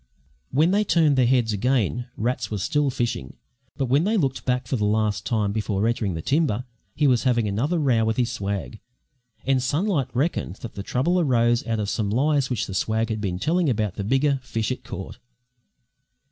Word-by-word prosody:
When 155 Hz, +7 st, +3 dB
they 205 Hz, +2 st, +3 dB
turned 160 Hz, -7 st, +3 dB
their 130 Hz, -2 st, +3 dB
heads 120 Hz, -4 st, +2 dB
again, 120 Hz, +2 st, 0 dB
Rats 125 Hz, +3 st, -1 dB
was 105 Hz, -3 st, -3 dB
still 150 Hz, +1 st, +1 dB
fishing 120 Hz, -, -3 dB, 0.4 s
but 135 Hz, -, 0 dB
when 135 Hz, +5 st, +2 dB
they 215 Hz, +4 st, +1 dB
looked 135 Hz, -8 st, -1 dB
back 125 Hz, 0 st, 0 dB
for 130 Hz, -, -2 dB
the 105 Hz, -, -1 dB
last 105 Hz, -1 st, 0 dB
time 105 Hz, -2 st, 0 dB
before 105 Hz, 0 st, -1 dB
entering 110 Hz, -6 st, -1 dB
the 80 Hz, -, -5 dB
timber, 135 Hz, -6 st, +1 dB, 0.3 s
he 150 Hz, -, +1 dB
was 125 Hz, -4 st, +4 dB
having 120 Hz, -4 st, +1 dB
another 125 Hz, -, 0 dB
row 130 Hz, -7 st, +2 dB
with 110 Hz, 0 st, 0 dB
his 120 Hz, -1 st, +1 dB
swag; 100 Hz, 0 st, -4 dB, 0.7 s
and 130 Hz, -1 st, +2 dB
Sunlight 145 Hz, -, 0 dB
reckoned 135 Hz, -, -1 dB
that 115 Hz, -, -7 dB
the 100 Hz, -, -6 dB
trouble 140 Hz, -, +1 dB
arose 120 Hz, -6 st, +2 dB
out 115 Hz, -1 st, -1 dB
of 105 Hz, -, -1 dB
some 105 Hz, 0 st, -1 dB
lies 140 Hz, +4 st, +1 dB
which 125 Hz, -5 st, -1 dB
the 95 Hz, -, -7 dB
swag 110 Hz, +5 st, 0 dB
had 110 Hz, -1 st, -2 dB
been 95 Hz, -3 st, -2 dB
telling 160 Hz, -, +1 dB
about 105 Hz, -5 st, 0 dB
the 100 Hz, -, -4 dB
bigger 135 Hz, +5 st, +2 dB
fish 115 Hz, -2 st, -2 dB
it 130 Hz, -, -4 dB
caught. 95 Hz, -, -8 dB
120 Hz, 200 wpm, -24 LUFS, 105-140 Hz, 0.7 s, was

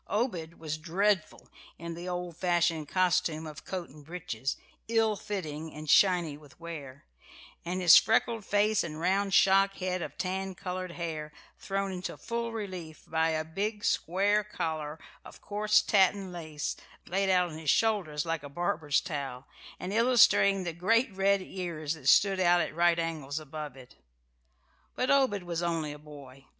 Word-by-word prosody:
Obed 185 Hz, -7 st, -2 dB
was 155 Hz, -1 st, -5 dB
dreadful 185 Hz, +2 st, 0 dB, 0.3 s
in 170 Hz, +1 st, -6 dB
the 175 Hz, +2 st, -6 dB
old 180 Hz, -1 st, -4 dB
fashioned 170 Hz, -3 st, +1 dB
costume 180 Hz, -3 st, +1 dB
of 155 Hz, -2 st, -9 dB
coat 185 Hz, -2 st, -4 dB
and 150 Hz, +1 st, -15 dB
breeches, 150 Hz, -6 st, -4 dB, 0.3 s
ill 225 Hz, -1 st, +2 dB
fitting 160 Hz, -7 st, -5 dB
and 155 Hz, 0 st, -9 dB
shiny 175 Hz, -3 st, +4 dB
with 145 Hz, -1 st, -18 dB
wear, 145 Hz, -5 st, -8 dB, 0.6 s
and 180 Hz, +2 st, -3 dB
his 175 Hz, -, +9 dB
freckled 225 Hz, +1 st, +2 dB
face 210 Hz, +1 st, +2 dB
and 155 Hz, -2 st, -6 dB
round 195 Hz, +3 st, +1 dB
shock 195 Hz, 0 st, +5 dB
head 185 Hz, -1 st, -2 dB
of -, -, -6 dB
tan 190 Hz, 0 st, -3 dB
coloured 185 Hz, -1 st, -5 dB
hair 160 Hz, -3 st, -5 dB, 0.3 s
thrown 195 Hz, 0 st, -2 dB
into 185 Hz, -1 st, -5 dB
full 235 Hz, 0 st, -3 dB
relief 185 Hz, -8 st, -7 dB
by 160 Hz, 0 st, +1 dB
a 155 Hz, -1 st, -1 dB
big, 205 Hz, +6 st, -3 dB
square 200 Hz, +4 st, +2 dB
collar 160 Hz, -6 st, -4 dB, 0.3 s
of -, -, -13 dB
coarse 210 Hz, +1 st, +2 dB
tatten 195 Hz, -2 st, +2 dB
lace 155 Hz, -4 st, -4 dB, 0.3 s
laid 195 Hz, +1 st, 0 dB
out 180 Hz, -2 st, +3 dB
on 155 Hz, -, -8 dB
his 155 Hz, -2 st, -3 dB
shoulders 185 Hz, -10 st, +1 dB
like 165 Hz, -2 st, -2 dB
a 145 Hz, -, -9 dB
barber's 155 Hz, -2 st, 0 dB
towel, 135 Hz, -4 st, -5 dB, 0.3 s
and 185 Hz, +2 st, -4 dB
illustrating 225 Hz, -4 st, +5 dB
the 170 Hz, -2 st, -3 dB
great 225 Hz, +7 st, +2 dB
red 195 Hz, 0 st, +2 dB
ears 170 Hz, -5 st, -4 dB
that 145 Hz, -4 st, -1 dB
stood 195 Hz, +2 st, +5 dB
out 175 Hz, -1 st, +4 dB
at 160 Hz, -, -1 dB
right 170 Hz, +1 st, +3 dB
angles 155 Hz, -4 st, -3 dB
above 150 Hz, -2 st, -7 dB
it. 125 Hz, -1 st, -15 dB, 1.0 s
But 255 Hz, -, +1 dB
Obed 260 Hz, -9 st, +3 dB
was 170 Hz, -1 st, -3 dB
only 165 Hz, -3 st, -1 dB
a 145 Hz, -, -9 dB
boy. 140 Hz, -3 st, -13 dB
175 Hz, 160 wpm, -29 LUFS, 155-195 Hz, 1.0 s, his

